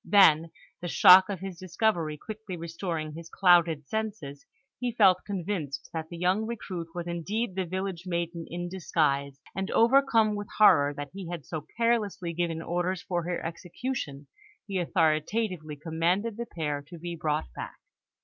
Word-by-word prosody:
Then, 165 Hz, -5 st, +6 dB, 0.3 s
the 175 Hz, -, -4 dB
shock 185 Hz, +3 st, +8 dB
of 190 Hz, -3 st, -4 dB
his 190 Hz, -3 st, -6 dB
discovery 175 Hz, -4 st, 0 dB
quickly 210 Hz, 0 st, -7 dB
restoring 165 Hz, -2 st, -4 dB
his 165 Hz, +1 st, -9 dB
clouded 170 Hz, -5 st, +4 dB
senses, 205 Hz, -11 st, -4 dB, 0.3 s
he 245 Hz, -1 st, -1 dB
felt 190 Hz, -5 st, +5 dB
convinced 175 Hz, -8 st, -4 dB
that 160 Hz, -1 st, -4 dB
the 170 Hz, -, -7 dB
young 185 Hz, +5 st, +1 dB
recruit 185 Hz, -7 st, -5 dB
was 175 Hz, -1 st, -3 dB
indeed 190 Hz, +6 st, -2 dB
the 185 Hz, -1 st, -2 dB
village 185 Hz, 0 st, -4 dB
maiden 170 Hz, -1 st, -3 dB
in 175 Hz, +1 st, -4 dB
disguise, 140 Hz, -6 st, 0 dB, 0.2 s
and, 190 Hz, +1 st, -2 dB
overcome 230 Hz, -3 st, +4 dB
with 205 Hz, -1 st, -4 dB
horror 160 Hz, -9 st, +6 dB
that 145 Hz, 0 st, -6 dB
he 190 Hz, -3 st, -7 dB
had 170 Hz, -5 st, -6 dB
so 155 Hz, -2 st, -6 dB
carelessly 215 Hz, -7 st, 0 dB
given 165 Hz, -1 st, -2 dB
orders 175 Hz, +1 st, -1 dB
for 175 Hz, -2 st, -1 dB
her 175 Hz, 0 st, -3 dB
execution, 170 Hz, -, -5 dB, 0.4 s
he 195 Hz, -3 st, -2 dB
authoritatively 165 Hz, 0 st, 0 dB
commanded 170 Hz, +8 st, 0 dB
the 235 Hz, +1 st, -5 dB
pair 150 Hz, -5 st, -3 dB
to 170 Hz, +2 st, -10 dB
be 170 Hz, +1 st, -5 dB
brought 155 Hz, -, -1 dB
back. -, -, -6 dB
175 Hz, 160 wpm, -28 LUFS, 160-200 Hz, 0.4 s, shock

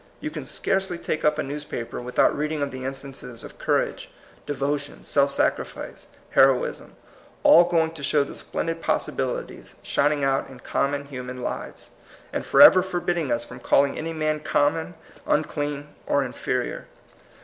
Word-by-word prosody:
You -, -, -4 dB
can -, -, -6 dB
scarcely 190 Hz, -2 st, 0 dB
take 155 Hz, -, -3 dB
up 150 Hz, 0 st, +3 dB
a 155 Hz, -, 0 dB
newspaper 140 Hz, -5 st, -5 dB
without 125 Hz, +1 st, +2 dB
reading 150 Hz, 0 st, -1 dB
of 140 Hz, -, -3 dB
the 130 Hz, 0 st, -6 dB
instances 135 Hz, -3 st, -6 dB
of -, -, -12 dB
courage, -, -, 0 dB, 0.4 s
devotion, 145 Hz, 0 st, -2 dB
self 140 Hz, -1 st, +2 dB
sacrifice, 140 Hz, -, -2 dB, 0.2 s
heroism, 135 Hz, -2 st, +3 dB, 0.2 s
— -, -, -28 dB
all 170 Hz, +1 st, +8 dB
going 165 Hz, -2 st, +2 dB
to 165 Hz, -3 st, -10 dB
show 145 Hz, +1 st, +2 dB
the 140 Hz, -, -8 dB
splendid 165 Hz, 0 st, -4 dB
possibili -, -, -1 dB
ties -, -, -16 dB
shining 145 Hz, 0 st, +1 dB
out 135 Hz, 0 st, +1 dB
in 130 Hz, -2 st, -12 dB
common 140 Hz, 0 st, -1 dB
human 125 Hz, -2 st, -7 dB
lives, -, -, -6 dB, 0.4 s
and -, -, -2 dB
forever 185 Hz, -, +9 dB
forbidding 175 Hz, -4 st, -1 dB
us 120 Hz, 0 st, 0 dB
from -, -, -10 dB
calling 140 Hz, 0 st, +3 dB
any 165 Hz, +1 st, -4 dB
man 155 Hz, -1 st, -1 dB
common, 160 Hz, +3 st, 0 dB, 0.3 s
unclean, 145 Hz, -1 st, -1 dB, 0.2 s
or 140 Hz, -, +2 dB
inferior. 125 Hz, 0 st, -3 dB
145 Hz, 155 wpm, -24 LUFS, 135-155 Hz, 0.4 s, forever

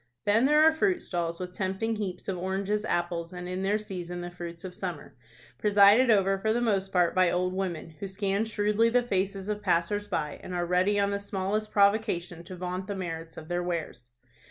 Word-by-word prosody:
Then 220 Hz, +4 st, +4 dB
there 300 Hz, +2 st, +5 dB
are 320 Hz, -, +7 dB
fruit 360 Hz, +2 st, +1 dB
stalls 170 Hz, -2 st, -3 dB
with 180 Hz, 0 st, -6 dB
tempting 195 Hz, +4 st, -2 dB
heaps 185 Hz, -4 st, -5 dB
of 195 Hz, -, -1 dB
oranges, 190 Hz, +3 st, -1 dB
apples, 170 Hz, -3 st, -2 dB
and 180 Hz, -1 st, -7 dB
in 185 Hz, +1 st, -3 dB
their 200 Hz, +2 st, +1 dB
season 180 Hz, -4 st, -6 dB
the 175 Hz, 0 st, -6 dB
fruits 170 Hz, 0 st, -8 dB
of 185 Hz, -1 st, -6 dB
summer, 175 Hz, -5 st, -6 dB, 0.4 s
presided 210 Hz, +4 st, +6 dB
over 195 Hz, -2 st, +3 dB
for 220 Hz, +2 st, +1 dB
the 235 Hz, -, +1 dB
most 195 Hz, -5 st, 0 dB
part 180 Hz, -2 st, +3 dB
by 185 Hz, -1 st, +4 dB
old 180 Hz, +1 st, 0 dB
women, 180 Hz, -4 st, -3 dB
who 200 Hz, -, -4 dB
scan 200 Hz, +2 st, -1 dB
shrewdly 210 Hz, +1 st, +2 dB
the 245 Hz, +1 st, +3 dB
faces 195 Hz, -3 st, -1 dB
of 210 Hz, 0 st, -2 dB
passers 205 Hz, +2 st, 0 dB
by, 150 Hz, -7 st, -3 dB
and 180 Hz, -, -6 dB
are 175 Hz, 0 st, 0 dB
ready 185 Hz, +4 st, +2 dB
on 200 Hz, 0 st, +2 dB
the 200 Hz, -, -1 dB
smallest 200 Hz, +2 st, -2 dB
provocation 200 Hz, -5 st, +1 dB
to 185 Hz, -, -8 dB
vaunt 180 Hz, +1 st, -4 dB
the 200 Hz, -, -3 dB
merits 165 Hz, -3 st, -6 dB
of 155 Hz, -, -9 dB
their 175 Hz, +1 st, -1 dB
wares. 165 Hz, -9 st, -4 dB
190 Hz, 205 wpm, -28 LUFS, 175-205 Hz, 0.4 s, are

